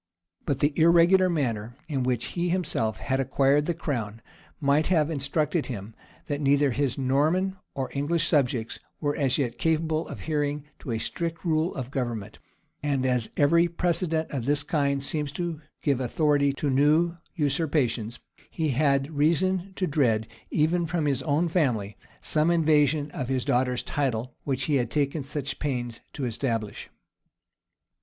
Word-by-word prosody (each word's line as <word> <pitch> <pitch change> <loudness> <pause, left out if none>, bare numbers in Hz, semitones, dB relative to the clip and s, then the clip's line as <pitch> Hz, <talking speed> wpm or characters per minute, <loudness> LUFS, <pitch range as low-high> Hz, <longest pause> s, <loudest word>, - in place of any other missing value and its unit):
But 140 -3 0
the 145 +1 +3
irregular 170 +3 +5
manner 120 -8 -1
in 140 -4 -1
which 125 -1 -1
he 175 0 -1
himself 170 - 0
had 130 0 -1
acquired 140 +2 +2
the 175 - 0
crown 115 -9 -3 0.4
might 145 +1 +2
have 165 -4 +2
instructed 150 +2 0
him, 110 -3 -6 0.3
that 145 0 -3
neither 140 0 +3
his 135 0 -1
Norman 155 +9 +1 0.2
nor 135 -1 -2
English 145 +4 +1
subjects 125 -7 0 0.2
were 145 -1 0
as 135 -5 +1
yet 125 -5 -2
capable 160 0 0
of - - -7
adhering 150 -2 -2
to - - -9
a 115 - 0
strict 165 +9 -3
rule 160 +1 +1
of 130 -1 -5
government; 115 -6 -4 0.4
and 140 -3 0
as 125 -3 +1
every 170 +4 +4
precedent 170 -2 0
of 130 -5 -3
this 145 +1 +1
kind 140 -2 0
seems 150 0 -1
to 170 -2 -3 0.2
give 140 -4 +2
authority 140 +2 +2
to 140 0 -1
new 155 +5 +3 0.2
usurpations, 140 - 0 0.3
he 160 -2 -1
had 140 +2 +1
reason 180 +5 +1
to 185 - 0
dread, 125 -9 +1 0.2
even 165 +2 +1
from 160 -2 -1
his 140 -2 +1
own 150 +5 +1
family, 125 - 0 0.3
some 155 +1 +3
invasion 150 -3 +3
of 130 -4 -4
his 130 -2 0
daughter's 125 0 +1
title, 125 -4 -2
which 135 -2 -1
he 145 0 +2
had 120 -3 -1
taken 145 +2 0
such 140 0 -4
pains 120 -5 -3
to 140 - -4
establish. 115 -3 -3
145 Hz, 155 wpm, -26 LUFS, 130-160 Hz, 0.4 s, irregular